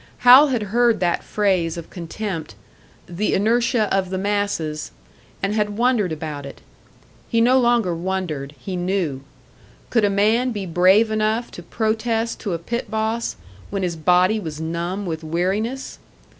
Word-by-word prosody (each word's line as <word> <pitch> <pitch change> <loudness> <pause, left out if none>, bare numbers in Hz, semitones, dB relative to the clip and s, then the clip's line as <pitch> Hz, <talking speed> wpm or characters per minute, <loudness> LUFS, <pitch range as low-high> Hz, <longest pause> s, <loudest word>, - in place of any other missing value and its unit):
Hal 260 +5 +9
had 245 -6 -1
heard 240 -1 +3
that 175 -2 0
phrase 185 -6 0
of 170 - -8
contempt, 170 - -5 0.5
"the 180 +5 -1
inertia 230 +2 +2
of 190 -1 0
the 190 - -2
masses," 190 -6 -2 0.5
and 195 +1 0
had 210 -1 -1
wondered 235 -6 +2
about 150 -2 -5
it. 140 - -10 0.7
He 230 - +2
no 250 +3 +5
longer 235 -7 +2
wondered, 165 -5 -3
he 185 +8 -6
knew. 175 -6 -1 0.7
Could 230 -3 +3
a 205 - +4
man 215 +5 +2
be 205 -4 -4
brave 185 +6 +4
enough 215 +2 0
to - - -9
protest 225 +1 -1
to 200 -6 -3
a - - -1
pit 235 +9 -4
boss 220 +1 -1 0.3
when 195 -1 -3
his 175 -2 -1
body 180 +6 +3
was 160 -6 -6
numb 170 +5 -3
with 160 -2 -4
weariness? 195 +11 -2
200 Hz, 155 wpm, -21 LUFS, 170-225 Hz, 0.7 s, Hal